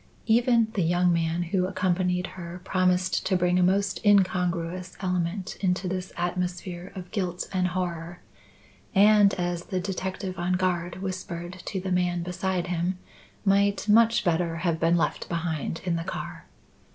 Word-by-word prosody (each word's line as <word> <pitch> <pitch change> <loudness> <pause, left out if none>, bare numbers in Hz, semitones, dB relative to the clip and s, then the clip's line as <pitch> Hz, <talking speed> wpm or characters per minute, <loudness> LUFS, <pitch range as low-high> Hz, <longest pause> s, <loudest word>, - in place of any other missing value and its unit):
Even 235 0 +4
the 200 - 0
young 175 +1 +3
man 165 +1 0
who 180 +1 0
accompanied 180 -1 0
her 175 -1 -7
promised 185 0 +1
to 190 - +3
bring 180 0 +2
a - - +4
most 195 +2 +1
incongruous 180 -3 +1
element 180 0 -2
into 185 -1 0
this 185 0 -3
atmosphere 180 +1 -3
of 180 -2 -8
guilt 180 -5 -2
and 185 -1 +2
horror, 175 -1 -3 0.8
and, 205 0 +6
as 175 -1 -2
the 185 -3 -2
detective 190 0 -4
on 175 +1 0
guard 180 0 -1
whispered 185 -1 -5
to 195 - -3
the 185 0 -4
man 180 -1 +1
beside 180 0 -2
him, 180 +1 -1 0.5
might 200 +1 +2
much 225 +2 +5
better 170 -2 +1
have 165 -2 +1
been 170 +1 +3
left 165 - -1
behind 165 -2 -2
in 175 -2 +1
the 165 - -3
car. 190 - -6
180 Hz, 150 wpm, -26 LUFS, 175-190 Hz, 0.8 s, and